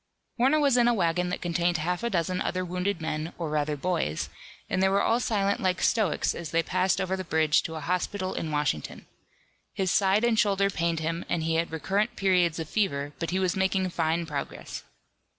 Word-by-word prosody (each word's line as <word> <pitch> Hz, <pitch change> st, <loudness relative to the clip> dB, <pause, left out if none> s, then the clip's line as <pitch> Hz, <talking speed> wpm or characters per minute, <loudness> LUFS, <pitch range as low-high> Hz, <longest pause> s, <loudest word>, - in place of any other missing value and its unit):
Warner 270 Hz, +5 st, +4 dB
was 280 Hz, -4 st, +3 dB
in 240 Hz, -1 st, +4 dB
a 240 Hz, -, +3 dB
wagon 180 Hz, -1 st, +1 dB
that 180 Hz, -, -4 dB
contained 175 Hz, 0 st, +1 dB
half 175 Hz, +3 st, -2 dB
a 235 Hz, -, -1 dB
dozen 180 Hz, -1 st, -1 dB
other 185 Hz, 0 st, -1 dB
wounded 180 Hz, 0 st, -2 dB
men, 160 Hz, +1 st, -3 dB
or 165 Hz, -3 st, -3 dB
rather 150 Hz, 0 st, 0 dB
boys, 160 Hz, -, -1 dB, 0.4 s
and 185 Hz, -, 0 dB
they 190 Hz, -, +4 dB
were 200 Hz, +1 st, +2 dB
all 230 Hz, -, +2 dB
silent 200 Hz, -4 st, 0 dB
like 185 Hz, -2 st, 0 dB
stoics 215 Hz, -9 st, +1 dB
as 170 Hz, -3 st, -6 dB
they 165 Hz, +1 st, +1 dB
passed 185 Hz, +2 st, +1 dB
over 190 Hz, 0 st, 0 dB
the 190 Hz, -, -4 dB
bridge 160 Hz, -2 st, +2 dB
to 160 Hz, -, -6 dB
a 160 Hz, -, -5 dB
hospital 185 Hz, +4 st, -2 dB
in 160 Hz, -, -3 dB
Washington. 145 Hz, -, -2 dB, 0.7 s
His 190 Hz, -2 st, 0 dB
side 200 Hz, +1 st, +3 dB
and 235 Hz, -2 st, +3 dB
shoulder 200 Hz, -1 st, +2 dB
pained 170 Hz, -2 st, -1 dB
him, 165 Hz, +2 st, -2 dB
and 165 Hz, -2 st, 0 dB
he 165 Hz, 0 st, 0 dB
had 165 Hz, 0 st, 0 dB
recurrent 195 Hz, +8 st, -1 dB
periods 180 Hz, -4 st, +2 dB
of 160 Hz, -2 st, -4 dB
fever, 145 Hz, -8 st, -1 dB
but 165 Hz, -, -2 dB
he 180 Hz, -, 0 dB
was 185 Hz, -1 st, +1 dB
making 190 Hz, 0 st, +1 dB
fine 165 Hz, 0 st, 0 dB
progress. 145 Hz, -3 st, -5 dB
180 Hz, 205 wpm, -27 LUFS, 160-195 Hz, 0.7 s, Warner